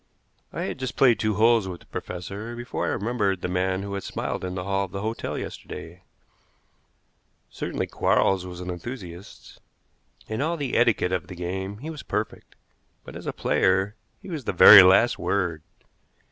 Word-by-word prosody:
I - - -4
had - - -4
just 130 -1 -4
played 120 -6 +4
two 110 -1 0
holes 115 -1 +4
with 90 -2 -7
the - - -18
professor 100 +6 -6
before 120 +1 -4
I - - 0
remembered 100 -4 -1
the - - -2
man 95 +1 -1
who 100 0 -5
had 100 - -3
smiled - - -4
in 90 0 -4
the 90 - -3
hall 100 0 0
of 90 - -14
the 100 +2 -5
hotel 110 +1 -3
yesterday. 85 +2 -8 1.5
Certainly - - -3
Quarles 95 -2 +1
was 90 -1 -8
an 90 0 -4
enthusiast. 90 -2 -9 0.7
In 110 +4 -3
all 165 +3 0
the 140 -4 -3
etiquette 115 -6 +3
of 95 - -2
the 90 - -9
game 95 +3 -4
he 160 - -4
was 150 -4 -8
perfect, 105 +2 -5 0.5
but - - -11
as - - -8
a - - 0
player 95 +2 +1 0.3
he 190 - -9
was 150 -7 -5
the - - -1
very 100 +3 +11
last 95 +6 +5
word. 90 -5 -1
100 Hz, 180 wpm, -25 LUFS, 90-115 Hz, 1.5 s, very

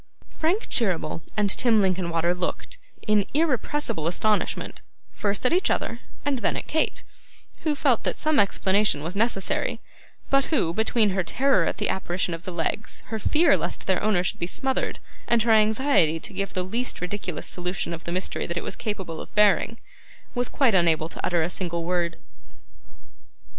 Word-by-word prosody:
Frank 350 +8 0
Cheeryble 180 -8 -1 0.2
and 210 -1 +3
Tim 230 -1 +4
Linkinwater 175 -3 +1
looked, 180 - -4 0.3
in 210 -1 +3
irrepressible 285 - 0
astonishment, 210 +5 -1 0.3
first 205 +3 -2
at 250 - +3
each 365 - +2
other 230 - -1 0.3
and 280 -3 0
then 215 - 0
at - - -3
Kate, 315 - 0 0.6
who 310 -2 0
felt 270 -5 +2
that - - -2
some 310 -1 +2
explanation 195 -4 +2
was 170 +4 -3
necessary, 210 -2 0 0.5
but 275 0 +4
who, 210 - +1
between 220 0 +2
her 190 0 0
terror 260 -3 +2
at - - -2
the - - 0
apparition 180 -2 -1
of 165 +1 -7
the 185 - -4
legs, 175 +5 -3
her 220 0 -3
fear 315 - +4
lest - - -4
their 190 -1 +1
owner 200 -4 +2
should 180 - -2
be 170 - -2
smothered, 265 +8 -2 0.3
and 235 -2 +3
her 230 - +2
anxiety 215 - +4
to 195 - -9
give 195 +1 -3
the 185 - 0
least 230 +7 -3
ridiculous 180 -2 -4
solution 180 -1 -3
of 165 - -7
the 170 - -5
mystery 185 +2 -2
that 170 - -3
it - - -2
was - - -3
capable 190 -7 -4
of - - -12
bearing, 210 +2 +4 0.6
was 245 -1 -1
quite 265 -6 +2
unable 165 -3 +3
to - - -8
utter 175 -2 +2
a - - 0
single 170 -2 -2
word. 170 -1 -1
200 Hz, 175 wpm, -25 LUFS, 175-235 Hz, 0.6 s, Tim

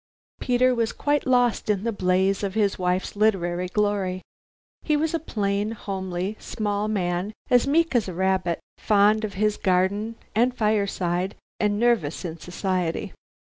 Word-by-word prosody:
Peter 255 0 +3
was 230 -2 0
quite 290 -1 0
lost 245 -4 +2
in 200 -2 +1
the 230 - 0
blaze 190 -1 +1
of 200 -1 -3
his 205 -3 +1
wife's 180 +2 -1
literary 180 -4 +1
glory. 195 -2 -1 0.6
He 305 -1 +1
was 315 +2 0
a 330 - +1
plain, 205 -5 -1
homely, 190 -1 -4
small 210 -2 -2
man, 185 -1 -1 0.2
as 245 +1 +5
meek 330 +3 +2
as 235 -5 +2
a 185 - -5
rabbit, 185 -2 0 0.2
fond 210 +1 +3
of 205 -2 -4
his 210 +1 +1
garden 195 +4 +1 0.2
and 245 +3 +2
fireside, 195 -4 0 0.2
and 205 -1 +1
nervous 220 -9 +1
in 165 -1 -5
society. 180 -1 -2
205 Hz, 150 wpm, -24 LUFS, 185-225 Hz, 0.6 s, as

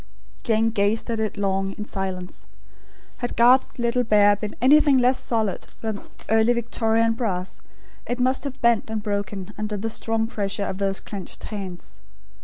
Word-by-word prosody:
Jane 225 0 +2
gazed 215 +2 0
at 225 - -1
it 215 -1 -2
long, 195 -1 0
in 210 - -6
silence. 190 -3 -5 0.7
Had 245 - -4
Garth's 250 +3 +5
little 240 +1 +1
bear 205 -2 +5
been 210 0 -6
anything 285 +3 +6
less 255 +1 +3
solid 220 -5 -1
than 220 -2 -3 0.3
Early 225 +2 +4
Victorian 230 -1 +1
brass; 190 -6 -3 0.5
it 245 +1 -2
must 260 +2 +2
have 275 -1 -5
bent 235 -2 +3
and 220 -1 -3
broken 200 -1 -3
under 210 0 -2
the 225 +3 -3
strong 225 0 -1
pressure 205 -3 -2
of 190 - -4
those 195 -1 -1
clenched 195 -4 -8
hands. 190 -5 -7
220 Hz, 160 wpm, -24 LUFS, 200-235 Hz, 0.7 s, anything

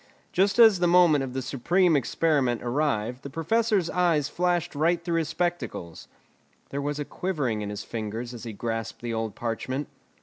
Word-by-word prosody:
Just 195 +3 +2
as 220 -5 +7
the 175 - +3
moment 170 -5 +5
of 130 -2 -5
the 130 0 -3
supreme 170 +7 +2
experiment 140 -3 +1
arrived 125 -2 -1
the 140 - -7
Professor's 195 - +1
eyes 165 -5 +1
flashed 175 0 0
right 165 +4 +2
through 170 -1 +1
his 160 -2 -2
spectacles. 170 - -3 0.6
There 140 - -3
was 145 +1 -2
a 145 - -3
quivering 140 - -2
in 105 - -4
his 105 0 -5
fingers 115 +2 -5
as 120 - -8
he 115 - -5
grasped 115 +2 -4
the 120 -1 -2
old 110 -2 -3
parchment. 130 +4 -3
145 Hz, 175 wpm, -26 LUFS, 120-175 Hz, 0.6 s, as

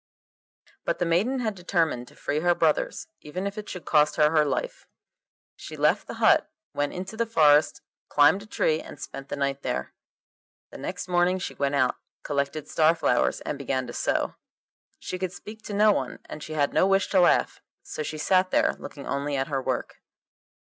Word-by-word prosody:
But - - -1
the 175 - 0
maiden 210 +11 +1
had 220 -3 -1
determined 165 -9 -1
to - - -17
free 145 - -2
her 175 +2 +2
brothers - - 0
even 180 +6 -5
if 200 0 -3
it 215 -1 -7
should 180 - -7
cost 150 -1 +3
her 150 -1 +4
her 155 -2 +4
life. 140 -3 -3 0.7
She - - -9
left - - +2
the - - -6
hut, - - +4 0.2
went 145 0 -1
into 190 +4 -6
the 230 +1 -1
forest, 150 -8 +4 0.3
climbed 145 +7 +5
a 210 - -12
tree, 160 -6 +1
and - - -11
spent 140 -1 -8
the - - -3
night 140 -1 -1
there. 65 - -3 0.8
The - - -10
next - - -5
morning 180 +1 +2
she 185 - -5
went 140 0 -1
out, 130 -3 +2 0.3
collected 140 +1 -2
star 160 +1 +3
flowers, 165 - +1
and 145 - -4
began 130 -2 -1
to 120 - -8
sew. - - 0 0.6
She 185 - -6
could 185 -1 -3
speak 215 +4 -10
to 205 - -6
no 210 +1 +5
one, - - -2
and 150 - -9
she 155 - -7
had 145 -2 +1
no 185 - +4
wish 195 0 +2
to 190 - +3
laugh, 175 - +2 0.2
so - - -6
she 155 +1 -4
sat 185 +4 +2
there, - - +2
looking 145 -1 -9
only 140 +1 -2
at 135 +1 -1
her 135 -2 -1
work. - - -3
160 Hz, 200 wpm, -26 LUFS, 145-185 Hz, 0.8 s, climbed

